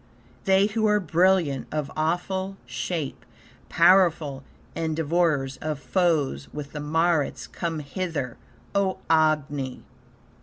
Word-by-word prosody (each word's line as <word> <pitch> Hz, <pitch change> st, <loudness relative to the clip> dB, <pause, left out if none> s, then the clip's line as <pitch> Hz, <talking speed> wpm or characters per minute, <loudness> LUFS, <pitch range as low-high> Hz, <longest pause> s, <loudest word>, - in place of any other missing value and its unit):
They 195 Hz, +1 st, +5 dB
who 215 Hz, +1 st, +1 dB
are 210 Hz, 0 st, +4 dB
brilliant, 170 Hz, -5 st, +2 dB
of 150 Hz, -2 st, -2 dB
awful 185 Hz, +4 st, -1 dB
shape, 135 Hz, +5 st, -4 dB, 0.5 s
Powerful, 170 Hz, -6 st, +4 dB, 0.3 s
and 160 Hz, -1 st, -1 dB
devourers 155 Hz, -4 st, +1 dB
of 155 Hz, -2 st, -3 dB
foes; 155 Hz, -4 st, 0 dB
with 145 Hz, -1 st, -7 dB
the 150 Hz, -, -6 dB
Maruts 150 Hz, -4 st, +1 dB
come 165 Hz, +7 st, -4 dB
hither, 145 Hz, -4 st, -3 dB, 0.4 s
O 195 Hz, -1 st, +1 dB
Agni! 150 Hz, -4 st, +1 dB
160 Hz, 110 wpm, -25 LUFS, 145-180 Hz, 0.5 s, They